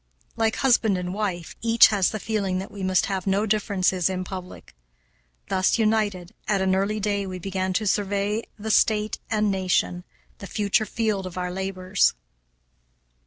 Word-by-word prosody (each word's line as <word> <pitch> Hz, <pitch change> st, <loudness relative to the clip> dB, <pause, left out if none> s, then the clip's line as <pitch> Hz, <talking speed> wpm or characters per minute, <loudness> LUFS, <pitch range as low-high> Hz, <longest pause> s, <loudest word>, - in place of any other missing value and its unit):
Like 220 Hz, -1 st, +1 dB
husband 235 Hz, -7 st, +3 dB
and 180 Hz, 0 st, -4 dB
wife, 190 Hz, -5 st, -3 dB
each 230 Hz, 0 st, +6 dB
has 200 Hz, -4 st, +2 dB
the 215 Hz, -, -4 dB
feeling 200 Hz, -4 st, -1 dB
that 190 Hz, -, -5 dB
we 200 Hz, -, -8 dB
must 185 Hz, -1 st, +2 dB
have 190 Hz, -1 st, -3 dB
no 195 Hz, +2 st, +2 dB
differences 190 Hz, -4 st, +1 dB
in 185 Hz, -1 st, -2 dB
public. 185 Hz, -1 st, -9 dB, 0.7 s
Thus 185 Hz, +3 st, +2 dB
united, 215 Hz, -5 st, 0 dB
at 200 Hz, -2 st, +2 dB
an 190 Hz, 0 st, +2 dB
early 200 Hz, +3 st, 0 dB
day 200 Hz, -1 st, -1 dB
we 185 Hz, -1 st, -5 dB
began 185 Hz, +1 st, -2 dB
to 215 Hz, +4 st, 0 dB
survey 205 Hz, +2 st, 0 dB, 0.2 s
the 220 Hz, +1 st, -3 dB
state 215 Hz, 0 st, +2 dB
and 215 Hz, -2 st, +1 dB
nation, 185 Hz, -2 st, 0 dB, 0.4 s
the 200 Hz, -, -8 dB
future 210 Hz, +3 st, 0 dB
field 215 Hz, -4 st, -1 dB
of 180 Hz, 0 st, -9 dB
our 180 Hz, 0 st, -2 dB
labors. 190 Hz, -, 0 dB
195 Hz, 165 wpm, -24 LUFS, 185-215 Hz, 0.7 s, each